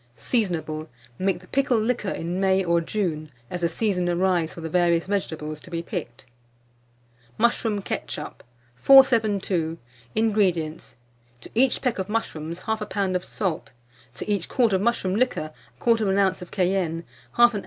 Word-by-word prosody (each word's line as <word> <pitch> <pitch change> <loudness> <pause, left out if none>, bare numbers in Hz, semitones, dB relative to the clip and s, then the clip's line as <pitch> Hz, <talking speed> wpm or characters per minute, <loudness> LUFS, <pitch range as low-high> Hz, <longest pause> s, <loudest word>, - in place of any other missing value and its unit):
Seasonable. 165 -9 -1 0.3
Make 190 -1 0
the 180 - -17
pickle 265 -2 +2
liquor 220 -2 0
in 175 +2 -3
May 190 0 +3
or 170 -1 +2
June, 165 -5 -2 0.2
as 180 - -4
the 170 - +2
season 180 -1 0
arrives 175 -2 +1
for 170 - -8
the 165 - -4
various 170 0 +2
vegetables 160 -6 -3
to - - -13
be 170 -1 -3
picked. 135 - -6 1.1
MUSHROOM 225 -3 +1
KETCHUP. - - -5 0.3
472. 205 - +4 0.4
INGREDIENTS. 180 - 0 0.5
To - - -11
each 255 +2 +2
peck 245 -5 0
of 190 +1 -3
mushrooms 170 -6 -3
1/2 220 -1 -2
lb. 190 -2 0
of 180 - 0
salt; 175 -9 -3 0.4
to - - -6
each 205 -4 -1
quart 235 -5 +2
of 190 - +2
mushroom 205 -4 +1
liquor 220 -10 0 0.3
1/4 220 -4 +2
oz. 185 - -12
of 180 - -8
cayenne, 180 -3 0 0.3
1/2 240 0 +6
oz. - - 0
190 Hz, 155 wpm, -25 LUFS, 170-215 Hz, 1.1 s, 1/2